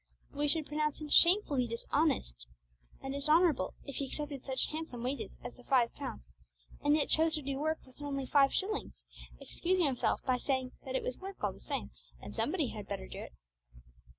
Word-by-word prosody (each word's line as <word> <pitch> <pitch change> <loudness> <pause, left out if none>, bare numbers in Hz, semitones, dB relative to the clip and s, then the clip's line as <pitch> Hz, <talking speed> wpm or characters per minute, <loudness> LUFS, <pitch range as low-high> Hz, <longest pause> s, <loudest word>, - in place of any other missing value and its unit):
But - - -10
we 295 - +2
should 310 +1 +2
pronounce 300 0 -1
him 305 -1 -6
shamefully 320 - +5
dishonest 230 - 0 0.6
and 270 0 -3
dishonourable 300 - +3
if 280 - -6
he 275 - -1
accepted 285 -1 -5
such 265 -1 +1
handsome 305 -7 -5
wages 260 +1 -3
as - - -7
the 250 - -16
five 245 -3 +3
pounds, 60 +1 -7 0.5
and 290 +1 +5
yet 300 -2 +2
chose 320 0 +3
to 305 - -3
do 275 0 -2
work 315 +2 -1
worth 260 +2 -17
only 275 -2 -2
five 275 0 +5
shillings, 415 +2 -2 0.4
excusing 360 0 +1
himself 265 -4 +1
by 255 -2 +2
saying 260 -1 -1
that 260 -1 -3
it - - 0
was 250 - -3
work 385 - -8
all 205 -2 +1
the - - -15
same, - - -4 0.3
and - - -9
somebody - - 0
had - - -7
better 65 - -4
do - - -8
it. - - -8
280 Hz, 195 wpm, -33 LUFS, 255-310 Hz, 0.6 s, shamefully